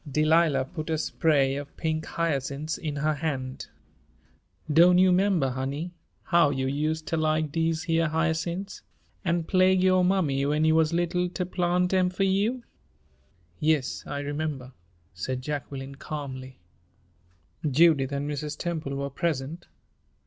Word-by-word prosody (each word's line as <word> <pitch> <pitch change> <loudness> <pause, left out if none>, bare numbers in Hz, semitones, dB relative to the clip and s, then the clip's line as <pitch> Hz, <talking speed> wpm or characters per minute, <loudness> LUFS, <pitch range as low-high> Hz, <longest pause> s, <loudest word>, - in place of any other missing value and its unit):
Delilah 155 -2 +3
put 155 +3 -7
a 160 - +1
spray 145 -4 +1
of 145 0 -7
pink 160 -1 -2
hyacinths 150 -1 -2
in 150 -3 -4
her 155 +2 +1
hand. 135 -4 -4 1.1
"Doan' 175 +3 +7
you 185 0 +5
'member, 180 -6 +2
honey, 140 +7 -4 0.3
how 170 -4 +4
you 135 -2 -1
useter 155 +4 -1
like 155 -1 0
dese 165 0 0
heah 165 -1 +1
hy'cints, 170 +4 -2 0.4
an' 170 -2 0
plague 185 +1 +3
yo' 185 0 +4
mammy 180 -7 +1
when 150 +2 +1
you 160 - +4
wuz 160 -1 +3
little 175 +1 0
ter 180 0 -3
plant 180 0 0
'em 185 -1 +3
fur 185 +2 -1
you?" 205 +6 +1 1.0
"Yes, 150 -3 0
I 140 - -3
remember," 145 -3 -4 0.4
said 125 +8 -4
Jacqueline, 140 -1 -5
calmly. 135 -3 -7 1.1
Judith 145 -2 +4
and 140 +1 -2
Mrs. 150 +1 -4
Temple 160 -5 -3
were 140 0 -3
present. 155 +1 -3
155 Hz, 135 wpm, -27 LUFS, 140-170 Hz, 1.1 s, Doan